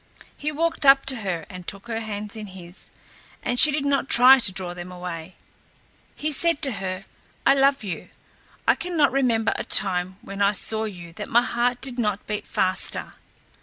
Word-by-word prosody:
He 300 +1 -4
walked 330 +1 -2
up 275 0 +6
to 270 -2 +3
her 185 -7 -4
and 185 -3 -11
took 200 +1 -7
her 225 -1 -3
hands 210 -1 -5
in 215 -1 -8
his, 180 -1 -9 0.5
and 245 - -1
she 305 - +8
did 285 -1 -2
not 280 -1 0
try 255 +2 +7
to 215 - +4
draw 185 -2 -5
them 175 +1 -9
away. 180 -1 -8 0.8
He 305 +1 -3
said 335 +1 +2
to 270 - +2
her, 190 -2 -5 0.4
"I 275 - +6
love 275 -2 +2
you; 190 -4 -6 0.6
I - - +6
cannot 330 -6 0
remember 235 -5 +1
a - - -3
time 185 -1 +3
when 195 0 -7
I 200 +1 +3
saw 220 +2 0
you 175 -5 -9
that - - -8
my 240 +1 +4
heart 245 +1 -1
did 255 -2 -3
not 210 -3 -2
beat 210 -1 -5
faster. 185 0 +2
220 Hz, 190 wpm, -23 LUFS, 185-270 Hz, 0.8 s, she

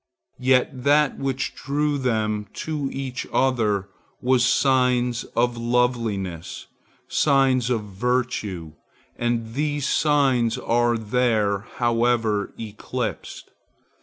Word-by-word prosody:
Yet 130 0 +2
that 145 0 +3
which 135 -1 -2
drew 145 0 -1
them 110 -4 -1
to 150 -4 -3
each 135 -2 -5
other 110 -7 +1 0.3
was 125 -1 +2
signs 125 -2 +2
of 120 0 +1
loveliness, 115 -8 -1 0.4
signs 135 -4 +2
of 115 -4 0
virtue; 105 -6 -2 0.4
and 115 -1 -2
these 145 +1 -1 0.2
virtues 135 -6 +2
are 120 0 +1
there, 110 -3 +1 0.2
however 115 -3 +1
eclipsed. 110 -2 -5
120 Hz, 95 wpm, -23 LUFS, 110-130 Hz, 0.4 s, that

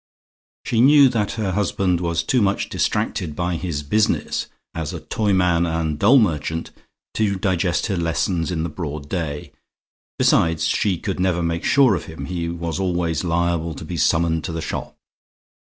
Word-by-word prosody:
She 115 - +1
knew 140 +1 +7
that 110 -4 -1
her 105 -4 -2
husband 95 -2 0
was 85 -1 0
too 125 - +1
much 100 -1 0
distracted 75 - -1
by 90 +1 -1
his 80 -5 -3
business 105 +9 0 0.3
as 80 +1 -4 0.2
toyman 90 -5 +2
and 80 -2 -2
doll 120 - +6
merchant 80 - 0 0.4
to 105 -3 +1
digest 95 -2 0
her 100 -5 -1
lessons 85 +1 0
in 85 -3 -2
the 85 - -2
broad 75 -3 -6
day. 75 -4 -4 0.7
Besides, 80 -1 +3
she 95 -4 +1
could 95 +1 -4
never 90 -2 +1
make 85 0 -2
sure 135 -5 +4
of 90 - -3
him: 80 0 -7
he 85 -2 -3
was 85 0 -4
always 85 -4 -1
liable 85 -1 0
to 80 - -8
be 85 - -5
summoned 80 -1 +1
to 90 - -4
the 80 - -4
shop. 80 - -5
85 Hz, 165 wpm, -21 LUFS, 80-95 Hz, 0.7 s, knew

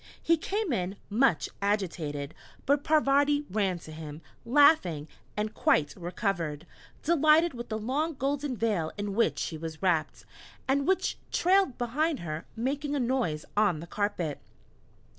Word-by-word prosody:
He 335 - +3
came 385 - -2
in, 185 -2 -2 0.2
much 215 - +3
agitated; 165 -8 -2 0.3
but 285 +1 +2
Parvati 290 -1 +3
ran 195 -3 +1
to 160 - -11
him, 155 0 -8 0.2
laughing, 230 - +4 0.3
and 215 +1 -1
quite 145 -2 +2
recovered, 175 -4 -3 0.4
delighted 315 +1 +4
with 240 -1 -7
the 215 - -2
long 280 +9 -1
golden 275 -1 -2
veil 205 -9 0
in 205 -1 -3
which 195 -9 +2
she 160 +1 -3
was 160 +1 -7
wrapped, 165 -4 0 0.4
and 275 +2 +1
which 380 0 +1
trailed 375 -7 +3
behind 280 +6 0
her, 155 -1 -5
making 280 +5 -2
a - - 0
noise 240 -12 0
on 205 -6 +3
the 165 - -7
carpet! 180 -6 -2
215 Hz, 140 wpm, -29 LUFS, -, 0.4 s, laughing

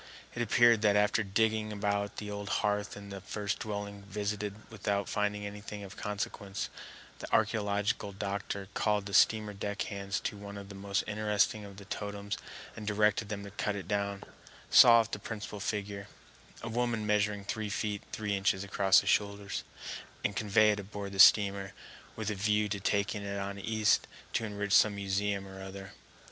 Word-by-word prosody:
It 120 - -3
appeared 120 0 +5
that 105 -2 +4
after 105 +2 +3
digging 110 +2 +1
about 100 0 -1
the 105 -1 -5
old 100 0 -5 0.2
hearth 105 0 -1
in 100 0 -9
the 100 -1 -7
first 105 0 -3
dwelling 100 -1 -5
visited 105 0 -3 0.2
without 100 -2 -1
finding 105 0 -1
anything 105 0 -7
of 95 -1 -9
consequence, 100 -1 -4 0.5
the - - -6
archæological 100 -1 0
doctor 100 -1 -3
called 105 -2 +1
the 100 - -7
steamer 105 -1 +4
deck 100 +1 -3
hands 100 -1 -3
to - - -3
one 100 0 -8
of 100 -1 -9
the - - -8
most 100 0 -1
interesting 105 0 +1
of 100 -1 -11
the 100 - -10
totems 100 0 -4 0.4
and 105 - -7
directed 105 0 +2
them 100 -1 -4
to 100 - -8
cut 105 0 -2
it 95 -4 -6
down, 100 -1 -1 0.5
saw 115 -1 +9
off 115 0 -6
the - - -3
principal 105 -2 -6
figure,—a 100 +2 -6
woman 115 -2 0
measuring 105 -1 +1
three 110 +1 -3
feet 105 0 -2
three 105 -2 -1
inches 95 0 +1
across 100 0 +4
the - - -11
shoulders,—and 100 0 -2
convey 105 0 +4
it 105 - -1
aboard 100 0 -6
the 100 - -7
steamer, 100 -2 +6 0.4
with 110 -1 -2
a - - 0
view 105 +1 +1
to 100 0 -3
taking 100 +1 0
it 100 0 -4
on 100 0 -4
East 110 +1 +2 0.3
to 115 - 0
enrich 105 -1 -2
some 105 -1 +6
museum 100 0 -1
or 95 0 -9
other. 95 0 -8
100 Hz, 175 wpm, -31 LUFS, 100-105 Hz, 0.5 s, saw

